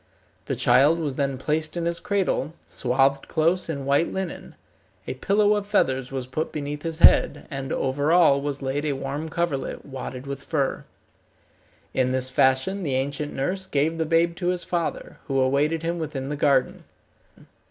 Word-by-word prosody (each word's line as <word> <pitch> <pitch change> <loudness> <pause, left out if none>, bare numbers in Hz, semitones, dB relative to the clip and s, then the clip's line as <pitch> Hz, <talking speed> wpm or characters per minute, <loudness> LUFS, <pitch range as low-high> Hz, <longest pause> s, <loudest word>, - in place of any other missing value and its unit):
The - - -1
child 150 +5 +4
was 150 -5 -2
then 135 -1 -1
placed 155 +4 -1
in 170 - -2
his 170 0 0
cradle, 185 -6 -1
swathed 135 +2 +1
close 170 +2 +1
in 140 -4 -3
white 140 +4 +2
linen. 190 -2 -5 0.5
A - - -3
pillow 205 +10 +2
of 205 -1 -2
feathers 135 -10 +1
was 135 -2 -3
put 145 +5 -3
beneath 145 0 -4
his 165 -1 -3
head, - - +5
and 135 -1 -4
over 140 +3 0
all 165 -6 +5
was 145 -1 -4
laid 135 +2 -1
a 145 - 0
warm 140 +4 -4
coverlet, 165 -5 -2
wadded 130 -1 -7
with 140 0 -5
fur. 140 -4 -2 1.1
In 130 -1 +1
this 130 0 0
fashion 130 +10 +2
the 140 -7 -1
ancient 140 +2 -2
nurse 185 +8 -2
gave 155 +3 0
the 160 - +1
babe 170 +1 +2
to 175 - -2
his 180 -1 0
father, 170 -2 -3
who 135 -1 0
awaited 145 +5 +1
him 170 +1 -2
within 140 -4 -4
the 150 - -2
garden. 140 -3 +1
145 Hz, 175 wpm, -24 LUFS, 135-165 Hz, 1.1 s, head